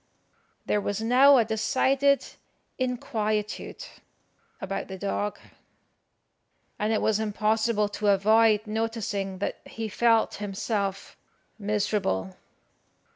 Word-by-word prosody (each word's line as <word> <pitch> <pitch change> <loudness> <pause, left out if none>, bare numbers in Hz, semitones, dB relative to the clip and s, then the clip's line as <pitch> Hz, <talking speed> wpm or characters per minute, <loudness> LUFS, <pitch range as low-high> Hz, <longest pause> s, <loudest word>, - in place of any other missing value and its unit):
There 210 - +1
was 205 0 -2
now 260 +5 +6
a 235 - +4
decided 265 +5 +2 0.5
inquietude 215 -4 -2 0.7
about 195 0 -4
the 190 - -7
dog, 200 +1 -2 1.4
and 210 +1 0
it 220 - +1
was 220 -1 +2
impossible 215 0 +1
to 210 0 -3
avoid 215 +2 +4
noticing 215 -3 -3
that 200 - -3
he 225 -1 -5
felt 225 +1 +2
himself 200 -1 -3 0.4
miserable. 200 - -1
215 Hz, 95 wpm, -26 LUFS, 200-225 Hz, 1.4 s, now